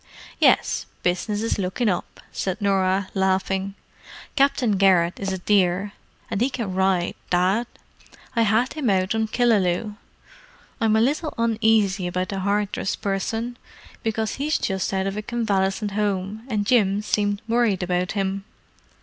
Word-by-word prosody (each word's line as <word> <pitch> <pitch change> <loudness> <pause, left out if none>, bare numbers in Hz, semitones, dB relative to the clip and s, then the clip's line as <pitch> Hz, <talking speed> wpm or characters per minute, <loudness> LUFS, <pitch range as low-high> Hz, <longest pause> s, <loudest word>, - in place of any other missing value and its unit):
"Yes, - - +3 0.2
business 205 +4 0
is 225 - -1
looking 195 +5 -1
up," 180 -4 -2
said 190 -1 -3
Norah, 195 -1 +1
laughing. 190 0 0 0.6
"Captain 275 -5 +3
Garrett 185 -3 +3
is 195 -1 -2
a 190 - -2
dear—and 195 +2 -1
he 250 - +3
can 230 -8 -4
ride, 190 -2 +1 0.2
Dad. 190 +6 +2 0.7
I 230 - +3
had 225 +3 +2
him 295 -7 -1
out 190 0 +2
on 220 0 0
Killaloe. 210 -3 +1 0.8
I'm 220 -1 +3
a 220 - +4
little 295 +6 0
uneasy 220 -4 +2
about 185 +1 -2
the 195 - -3
Hardress 200 0 -1
person, 225 +5 -3 0.4
because 220 -1 -2
he's 300 +3 0
just 190 -1 -2
out 190 0 0
of 195 +1 -3
a - - -1
convalescent 205 -3 -1
home, 205 +1 -2
and 210 -5 -1
Jim 205 -4 +3
seemed 205 -1 0
worried 225 -5 +2
about 180 0 -1
him. 195 -1 -2
200 Hz, 140 wpm, -23 LUFS, 190-225 Hz, 0.8 s, a